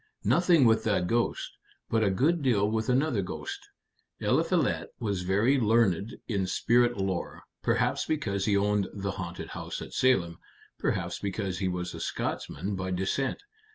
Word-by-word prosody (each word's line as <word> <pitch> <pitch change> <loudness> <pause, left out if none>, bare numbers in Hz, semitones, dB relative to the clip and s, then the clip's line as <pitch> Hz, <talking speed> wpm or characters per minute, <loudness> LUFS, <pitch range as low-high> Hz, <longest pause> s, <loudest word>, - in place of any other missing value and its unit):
"Nothing 170 -5 +4
with 110 -1 +4
that 100 -5 +2
ghost, 115 +5 0 0.4
but 115 -1 +1
a 100 - +3
good 150 - +2
deal 110 -7 +2
with 110 +1 -1
another 130 -3 +2
ghost. 90 - -6 0.5
Eliphalet - - +1
was 100 -5 -1
very 105 +9 +2
learned 110 -2 +2
in 100 -5 0
spirit 120 +4 +2
lore 95 -2 -3 0.2
perhaps - - +1
because 100 -11 -1
he 100 -2 +3
owned 100 -1 +1
the 100 -1 -2
haunted 90 -3 -6
house - - -5
at - - -8
Salem, 95 -11 +2 0.4
perhaps - - -1
because 95 -2 -3
he 95 - 0
was 90 -1 -3
a - - -7
Scotchman 100 +1 -3
by 95 0 -3
descent. 95 - -1
105 Hz, 155 wpm, -28 LUFS, 95-120 Hz, 0.5 s, Nothing